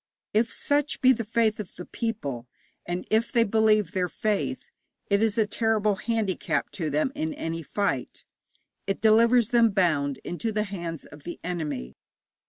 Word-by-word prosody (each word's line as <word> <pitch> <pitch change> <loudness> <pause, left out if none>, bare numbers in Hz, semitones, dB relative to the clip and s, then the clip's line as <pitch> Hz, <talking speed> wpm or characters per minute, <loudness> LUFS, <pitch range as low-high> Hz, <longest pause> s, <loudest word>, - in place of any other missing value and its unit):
If 225 +2 +2
such 290 +1 0
be 260 - +6
the 230 -1 -3
faith 220 0 +1
of 210 - -7
the 180 - -8
people, 140 - -4 0.4
and 175 +1 -3
if 220 +2 +2
they 235 -2 +4
believe 215 -3 +3
their 185 -3 0
faith, 210 +4 -1 0.5
it 200 +1 +4
is 220 -1 +1
a 220 - +4
terrible 215 -1 +1
handicap 215 -3 -1
to 160 -4 -3
them 150 - +1
in 160 - -3
any 165 0 -3
fight; 150 -6 -2 0.6
it 195 - -1
delivers 230 +1 +5
them 235 -2 +5
bound 155 -8 +1
into 200 +6 -3
the 210 0 0
hands 170 -6 -6
of 145 - -13
the 175 - -7
enemy. 155 - -4
205 Hz, 165 wpm, -26 LUFS, 170-225 Hz, 0.6 s, be